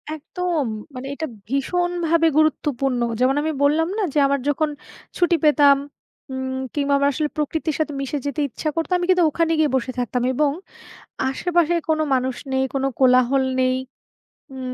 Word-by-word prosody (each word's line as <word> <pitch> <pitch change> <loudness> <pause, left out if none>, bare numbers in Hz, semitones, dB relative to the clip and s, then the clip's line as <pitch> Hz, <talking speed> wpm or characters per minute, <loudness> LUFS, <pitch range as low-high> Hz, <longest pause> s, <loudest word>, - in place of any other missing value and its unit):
একদম, 330 0 -2 0.3
মানে 260 +2 -6
এটা 315 +2 -4 0.2
ভীষণভাবে 335 +4 +1
গুরুত্বপূর্ণ। 275 -5 +1 0.2
যেমন 260 +2 +3
আমি 315 +1 -1
বললাম 320 +4 +3
না 430 - 0
যে, - - -2
আমার 280 0 +1
যখন 310 +2 +1 0.5
ছুটি 350 -1 +3
পেতাম 290 -2 +6 0.5
উম 260 0 -3 0.2
কিংবা 285 -1 +1
আমার 280 0 +3
আসলে 300 +2 -1
প্রকৃতির 305 +1 -1
সাথে 305 -2 -1
মিশে 275 +2 -3
যেতে 285 +2 -2
ইচ্ছা 305 +6 -3
করত, 330 -1 -2
আমি 355 - -1
কিন্তু 365 -2 +4
ওখানে 330 +2 0
গিয়ে 305 -2 +3
বসে 260 0 -1
থাকতাম 245 0 -1
এবং 290 +2 +2 0.8
আশেপাশে 345 +3 +1
কোন 315 0 +2
মানুষ 260 -1 0 0.2
নেই, 265 0 +2
কোন 270 - -1 0.2
কোলাহল 255 +1 +4 0.2
নেই। 255 0 +2 0.8
উম 255 -1 -5
290 Hz, 160 wpm, -22 LUFS, 265-320 Hz, 0.8 s, পেতাম